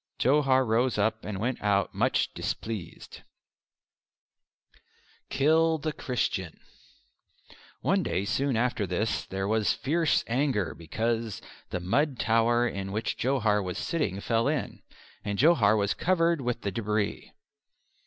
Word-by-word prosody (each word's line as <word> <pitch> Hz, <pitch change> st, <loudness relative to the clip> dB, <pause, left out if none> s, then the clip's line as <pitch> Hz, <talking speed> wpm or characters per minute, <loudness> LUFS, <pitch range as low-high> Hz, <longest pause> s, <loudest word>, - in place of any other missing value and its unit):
Johar 130 Hz, -1 st, +3 dB
rose 120 Hz, +2 st, +1 dB
up 110 Hz, +2 st, 0 dB
and 105 Hz, -2 st, -4 dB
went 120 Hz, +4 st, -2 dB
out 100 Hz, -1 st, +1 dB
much -, -, +1 dB
displeased. 110 Hz, -7 st, -5 dB, 2.1 s
"Kill 160 Hz, +3 st, +3 dB
the 155 Hz, 0 st, -3 dB
Christian!" 110 Hz, -, -2 dB, 1.2 s
One -, -, +2 dB
day 90 Hz, +4 st, -1 dB
soon 130 Hz, +3 st, 0 dB
after 115 Hz, -4 st, 0 dB
this 100 Hz, +5 st, -1 dB
there 95 Hz, +1 st, -3 dB
was 110 Hz, 0 st, +2 dB
fierce 160 Hz, +3 st, +1 dB
anger 115 Hz, -, 0 dB
because 110 Hz, +6 st, -2 dB, 0.3 s
the 90 Hz, -, -3 dB
mud 135 Hz, -, 0 dB
tower 115 Hz, +2 st, +2 dB
in 95 Hz, -3 st, -4 dB
which 110 Hz, +3 st, -2 dB
Johar 110 Hz, -5 st, +1 dB
was 90 Hz, -1 st, -4 dB
sitting 150 Hz, -, -2 dB
fell 115 Hz, +4 st, +1 dB
in, 150 Hz, -2 st, -2 dB, 0.4 s
and 105 Hz, -1 st, -3 dB
Johar 120 Hz, -8 st, +5 dB
was 100 Hz, -1 st, +1 dB
covered 170 Hz, -3 st, +1 dB
with 125 Hz, -1 st, -2 dB
the 100 Hz, -, -2 dB
debris. 105 Hz, 0 st, -2 dB
115 Hz, 125 wpm, -28 LUFS, 100-135 Hz, 2.1 s, Johar